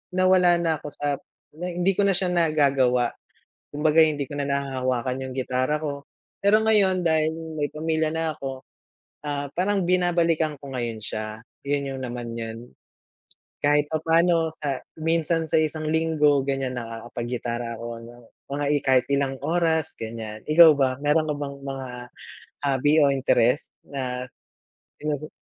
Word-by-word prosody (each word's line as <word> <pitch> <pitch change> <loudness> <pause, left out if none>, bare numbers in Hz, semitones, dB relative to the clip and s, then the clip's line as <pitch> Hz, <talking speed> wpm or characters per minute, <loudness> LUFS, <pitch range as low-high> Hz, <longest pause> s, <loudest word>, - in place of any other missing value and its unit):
nawala 185 -1 +5
na 165 -2 +1
ako - - -8
sap 145 -1 -1 0.4
nay 180 0 -4
hindi 180 +2 +2
ko 200 +1 +1
na 195 - +4
siya 185 -1 +1
nagagawa, 140 -7 +2 0.6
kumbaga 155 +2 +4
hindi 145 -3 -1
ko 145 - -6
na 145 - -1
nahahawakan 130 -2 -1
yung 130 - -6
gitara 130 +3 0
ko. 140 -2 -4 0.4
Pero 215 +2 +5
ngayon 205 -4 +3
dahil 160 -1 +2 0.2
may 145 -1 -2
pamilya 160 0 0
na 160 -1 -1
ako. 135 -1 -6 0.6
Ah, 145 -1 -3
parang 195 +1 +1
binabalikan 170 -4 +2
ko 140 -2 -9
ngayon 115 -3 -3
siya, 110 0 -4 0.2
'yon 140 -1 -1
yung - - -7
naman 120 -1 -5
'yon. 115 -1 -5 1.0
Kahit 145 0 +2
papaano 165 +1 +2 0.2
sa 140 -2 0 0.2
minsan 165 0 +1
sa - - +4
isang 155 0 -1
linggo 155 -3 +3
ganyan 135 -2 -1
nakakapag 115 0 -6
gitara 120 0 -4
ako 115 +1 -6
hanggang 120 +1 -13 0.3
mga 145 +1 -2
i 150 - +3
kahit 130 -2 +4
ilang 140 -1 +1
oras 160 -1 +1
ganyan, 110 -1 -6
ikaw 160 +1 +9
ba? 130 -2 +2
Mayro'n 155 +2 +3
ka 150 - 0
bang 140 -1 -5
mga 135 -1 -5 0.8
hobby 140 +2 +2
o 140 - +5
interest 130 -1 +1
na 125 -2 -4 0.7
di - - -16
ba - - +2
sa 155 - -8
145 Hz, 155 wpm, -24 LUFS, 130-160 Hz, 1.0 s, ikaw